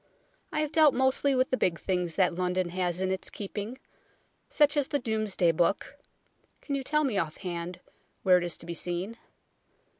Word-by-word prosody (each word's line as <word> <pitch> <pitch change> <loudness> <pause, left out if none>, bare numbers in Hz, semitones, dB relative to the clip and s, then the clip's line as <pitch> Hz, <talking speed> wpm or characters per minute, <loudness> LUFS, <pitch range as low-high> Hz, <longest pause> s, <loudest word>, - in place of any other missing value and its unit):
I 305 - 0
have 305 -1 -2
dealt 310 -3 +5
mostly 265 +2 +2
with 255 0 +1
the 260 - +2
big 170 -7 +1
things 180 -3 -1
that 185 -3 +3
London 180 0 -1
has 180 0 -1
in 190 - 0
its 190 - -2
keeping, 210 +4 -6 0.7
such 295 -1 +3
as 290 -2 +1
the 285 - 0
Domesday 215 -8 +1
Book 175 - 0 0.6
(can 285 - -5
you 275 - 0
tell 300 +3 +1
me 235 -9 +1
off 155 -1 -3
hand 175 -1 -5 0.4
where 180 -1 +6
it - - -4
is 175 -1 -1
to - - -9
be 170 - -4
seen 180 +6 -2
190 Hz, 185 wpm, -28 LUFS, 175-265 Hz, 0.7 s, where